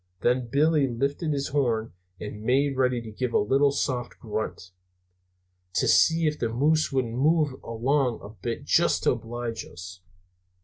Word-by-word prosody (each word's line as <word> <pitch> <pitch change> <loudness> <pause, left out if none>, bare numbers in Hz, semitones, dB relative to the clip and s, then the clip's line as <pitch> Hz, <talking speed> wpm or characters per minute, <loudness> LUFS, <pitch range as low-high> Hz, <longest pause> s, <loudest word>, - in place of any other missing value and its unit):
Then 125 0 +1
Billy 145 +3 +3
lifted 140 +6 -2
his 140 -1 -2
horn 120 -6 0 0.3
and 105 0 -7
made 135 +4 +1
ready 125 -2 +1
to 110 - -8
give 125 +3 -3
a - - +4
little 135 +6 +3
soft 130 -3 -2
grunt, 110 -4 -5 1.0
to - - +2
see 165 0 +4
if 150 0 0
the 115 - 0
moose 150 +7 +2
wouldn't 130 -4 -1
move 145 +1 +1
along 125 +2 0
a 100 - -8
bit, 115 +2 -5
just - - +2
to - - +4
oblige 115 0 -4
us. 90 +1 -11
125 Hz, 160 wpm, -26 LUFS, 115-140 Hz, 1.0 s, a